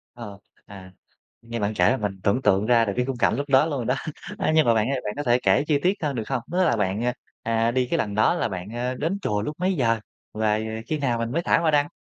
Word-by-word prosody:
Ờ, 105 -5 -9 0.3
à, 95 -2 -11 0.5
nghe 115 0 -6
bạn 105 0 -1
kể 90 +3 +4
là 130 - +1
mình 100 -4 -4
tưởng 110 +6 +2
tượng 100 -3 +2
ra 115 0 +4
được 100 - -2
cái 125 - 0
khung 135 -1 -3
cảnh 120 - +2
lúc 140 +3 -4
đó 135 +2 +5
luôn 155 -3 -2
rồi 120 - -3
đó. 125 - +1 0.4
A, 190 - +1
nhưng 155 - +5
mà 115 - +4
bạn 110 +3 +1
ơi 135 -2 -1
bạn 105 - -2
có 145 - -3
thể 120 0 +3
kể 95 +6 +3
chi 145 -2 +2
tiết 185 - +3
hơn, 145 -2 -1
được 115 - -2
không? 135 -3 -1
Tức 185 +1 +2
là 145 - +3
bạn, 105 +4 0 0.3
ờ, 115 0 +1
đi 130 +1 +1
cái 170 - +2
lần 105 -8 -2
đó 110 - +3
là - - -1
bạn, 95 -2 -6
ơ, 125 +3 -3
đến 165 +9 -2
chùa 105 - -1
lúc 150 +9 -4
mấy 185 +1 +1
giờ 115 -7 +1 0.3
và 110 0 +1 0.3
khi 155 - -1
nào 125 -4 0
mình 115 +1 -3
mới 170 - 0
thả - - +3
hoa 165 -2 +2
đăng? 145 -1 +3
120 Hz, 285 wpm, -24 LUFS, 105-140 Hz, 0.5 s, đó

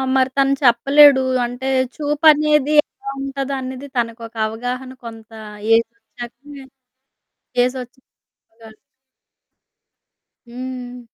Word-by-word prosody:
మరి 260 0 +3
తను 275 0 +3
చెప్పలేడు. 275 +3 +6 0.2
అంటే 245 +2 -7 0.3
చూపనేది 300 -1 +3
ఎలా 275 - -11
ఉంటదో 275 0 -4
అనేది 260 +2 -7
తనకొక 230 -1 -3
అవగాహన 245 +4 -5
కొంత 225 -1 -10 0.4
ఏ‌జోచ్చాకే, 240 +4 -4 1.0
ఏ‌జోచ్చ‌కే 255 +1 -4 0.3
చెప్పగలడు 225 -1 -18 1.7
హ్మ్. 250 0 -7
255 Hz, 80 wpm, -19 LUFS, 235-275 Hz, 1.7 s, చెప్పలేడు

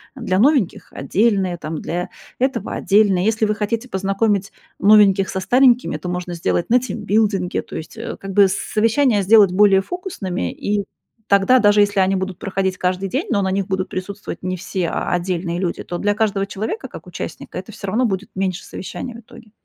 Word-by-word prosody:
для 185 - -1
новеньких 260 - +1
отдельные, 195 -4 +1
там, 155 -1 -5
для 175 +2 -3 0.3
этого 260 -5 -1
отдельные". 195 -3 +3
Если 220 0 +2
вы 210 0 0
хотите 225 +4 -3
познакомить 195 +1 0 0.3
новеньких 200 -1 +5
со 190 - -2
старенькими, 245 - +3
то 165 +4 -6
можно 180 0 -4
сделать 170 0 -1
на 245 +2 +5
тимбилдинге, 210 -5 -1
то - - -11
есть, 160 - -8
э, 230 - -6
как 195 0 -7
бы, 200 0 +6
с - - 0
совещания 225 0 +1
сделать 205 -1 +6
более 195 0 +5
фокусными, 195 - -4
и 205 0 -1 0.4
тогда, 200 +6 +4
даже 205 -2 +4
если 205 -1 +3
они 190 +1 +2
будут 190 -1 -4
проходить 190 -1 -2
каждый 185 +2 -1
день, 265 - -2
но 205 -5 +1
на 190 -1 0
них 195 0 0
будут 190 0 -2
присутствовать 185 -1 -6
не 185 0 -2
все, 185 -1 -3
а - - -2
отдельные 175 -1 -2
люди, 180 -2 -2
то 175 - -5
для 205 +3 +1
каждого 205 -2 0
человека 215 - -5
как - - -11
участника - - -7
это - - -7
всё 200 - -8
равно 220 +6 +1
будет 195 -3 -2
меньше 190 -1 -2
совещаний 240 +6 -7
в 230 - -10
итоге. 225 0 -16
195 Hz, 190 wpm, -20 LUFS, 185-220 Hz, 0.4 s, бы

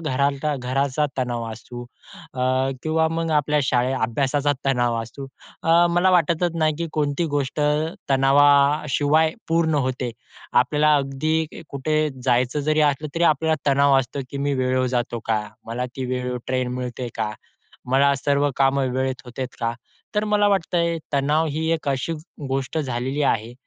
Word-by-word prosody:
घराता 140 0 0
घराचा 135 +3 0
तणाव 120 -2 -1
असू 120 +2 -9 0.5
अ, 125 - -2 0.4
किंवा 160 0 +1
मग 165 0 -2
आपल्या 150 0 +1
शाळे 125 0 +1
अभ्यासाचा 135 +4 0
तणाव 120 -3 +1
असू. 115 +5 -9 0.4
अ, 170 +1 +5
मला 175 +2 +3
वाटतच 170 -1 +2
नाही 155 -2 +1
की 170 - -2
कोणती 145 +1 0
गोष्ट 140 +1 -2 0.5
तणावाशिवाय 145 +3 +4 0.2
पूर्ण 165 -1 +2
होते. 130 -1 -2 0.4
आपल्याला 150 +5 +3
अगदी 155 +4 -1
कुठे 155 +3 0 0.2
जायचं 125 +2 +2
जरी 155 0 +3
असलं 150 +2 -5
तरी 170 - -1
आपल्याला 155 -1 +1
तणाव 140 0 +4
असतो, 135 +2 -3
की - - -6
"मी 140 +1 0
वेळेवर 130 0 +1
जातो 120 -1 -2
का? 110 -1 +1 0.3
मला 120 +2 -3
ती 130 - -3
वेळेवर 125 0 -2
ट्रेन 130 -1 -1
मिळते 125 0 -4
का? 110 -1 -2 0.6
मला 140 +2 +4
सर्व 140 +1 +1
कामं 135 0 +2
वेळेत 130 0 -2
होतात 125 +1 -6
का?" 115 0 0 0.4
तर 210 0 +1
मला 210 -1 +2
वाटतंय, 170 -3 +1
तणाव 145 +3 +2
ही 160 +2 -2
एक 160 -3 -2
अशी 135 +4 -1 0.4
गोष्ट 135 +3 -2
झालेली 130 0 -2
आहे, 115 -4 0
140 Hz, 150 wpm, -23 LUFS, 130-155 Hz, 0.6 s, अ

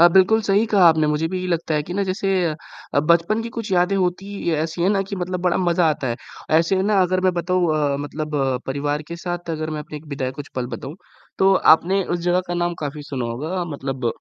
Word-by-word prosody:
अ, 170 - +9
बिल्कुल 190 +5 +4
सही 205 +2 +3
कहा 200 -4 +4
आपने 160 -1 +3
मुझे 150 +2 +1
भी 185 -1 -3
ये 185 - -3
लगता 165 -2 -1
है 150 - +1
कि 175 +4 -7
ना 200 - +1
जैसे 195 +1 -2 0.2
अ - - -3 0.4
अ, 140 - +4
बचपन 170 +8 +2
की 230 - -5
कुछ 225 -3 -4
यादें 180 +2 +3
होती 185 +1 -1
ही 170 -4 -2
ऐसी 160 +2 -2
है 185 - +3
ना 200 -1 +2
कि 195 +1 -6
मतलब 180 0 -3
बड़ा 180 -1 +2
मज़ा 175 -2 +2
आता 145 -3 -3
है, 120 - -2 0.4
ऐसे 170 +3 +1
में 190 - +1
ना 200 0 +3
अगर 185 +1 +1
मैं 185 0 +2
बताऊँ 175 +1 +1
अ, 145 -2 +1
मतलब 150 +1 -5
अ, 135 -2 +1
परिवार 145 +2 -2
के 170 - -5
साथ 175 0 -5
अगर 155 -1 -3
मैं 155 -1 -3
अपने 150 - -8
एक 150 +1 -11
बिताए 135 -3 -3
कुछ 145 - -8
पल 125 -1 -2
बताऊँ 145 +5 -8 0.4
तो 195 0 +5 0.2
आपने 190 +4 0
उस 175 - -2
जगह 180 +1 +2
का 175 - -2
नाम 175 0 0
काफ़ी 145 +1 -5
सुना 135 -4 -4
होगा 155 +11 -3
अ, - - -1
मतलब 135 -5 -4
170 Hz, 260 wpm, -21 LUFS, 150-185 Hz, 0.4 s, अ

